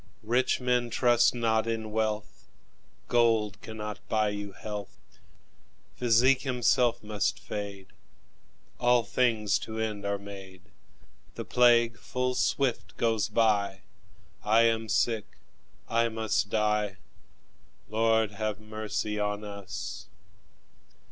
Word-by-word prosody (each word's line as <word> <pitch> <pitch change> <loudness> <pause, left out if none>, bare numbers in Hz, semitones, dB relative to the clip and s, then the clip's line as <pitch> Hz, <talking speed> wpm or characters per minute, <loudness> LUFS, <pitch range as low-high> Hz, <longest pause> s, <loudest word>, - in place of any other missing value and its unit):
Rich 120 +4 +1
men, 125 -1 +1
trust 120 0 +3
not 115 -1 +1
in 110 -1 -3
wealth, 110 -1 -2 0.6
Gold 110 -4 +2
cannot 105 -2 -6
buy 110 -1 +2
you 105 -1 -5
health; 105 +1 -9 0.8
Physic 125 +2 +4
himself 125 -3 +2
must 105 -1 -1
fade; 100 -2 -6 0.9
All 120 -1 +4
things 110 -2 +1
to 110 0 -7
end 110 -2 -3
are 100 0 -1
made; 95 -2 -11 0.7
The - - -5
plague 120 -2 +4
full 125 0 -2
swift 120 -10 -1
goes 115 -2 +1
by; 105 -3 +1 0.6
I 110 +2 +4
am 115 -1 +1
sick, 115 -1 0 0.5
I 115 0 +2
must 110 -2 -1
die 105 -2 0 0.9
Lord, 110 0 +2
have 105 0 -3
mercy 110 -1 -3
on 105 0 -2
us! 65 -12 -7
110 Hz, 110 wpm, -28 LUFS, 105-115 Hz, 0.9 s, Physic